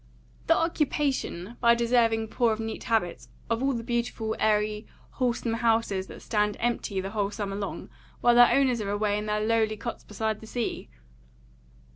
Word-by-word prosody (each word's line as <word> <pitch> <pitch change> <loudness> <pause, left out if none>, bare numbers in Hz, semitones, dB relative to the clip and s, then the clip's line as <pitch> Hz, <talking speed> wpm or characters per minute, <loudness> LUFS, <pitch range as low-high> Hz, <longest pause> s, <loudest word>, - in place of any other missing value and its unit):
"The 330 - +5
occupation, 280 - -1
by 235 -1 +6
deserving 230 -2 +2
poor 235 0 +2
of 215 - -5
neat 225 0 -5
habits, 175 - -1 0.2
of 230 +1 +1
all 275 0 +1
the 230 -2 -3
beautiful, 235 -2 -2
airy, 210 0 +1 0.2
wholesome 240 -2 -1
houses 225 -4 +1
that - - -11
stand 210 -2 0
empty 230 -4 -1
the 190 +1 -4
whole 205 -2 0
summer 205 -1 -4
long, 200 0 -5 0.3
while 240 - +4
their 240 0 +7
owners 255 -4 +3
are 200 - -3
away 205 0 0
in 210 - -5
their 210 0 0
lowly 220 -1 +1
cots 235 +2 -6
beside 220 0 -3
the 220 - -10
sea." 240 0 -3
225 Hz, 170 wpm, -27 LUFS, 210-235 Hz, 0.3 s, their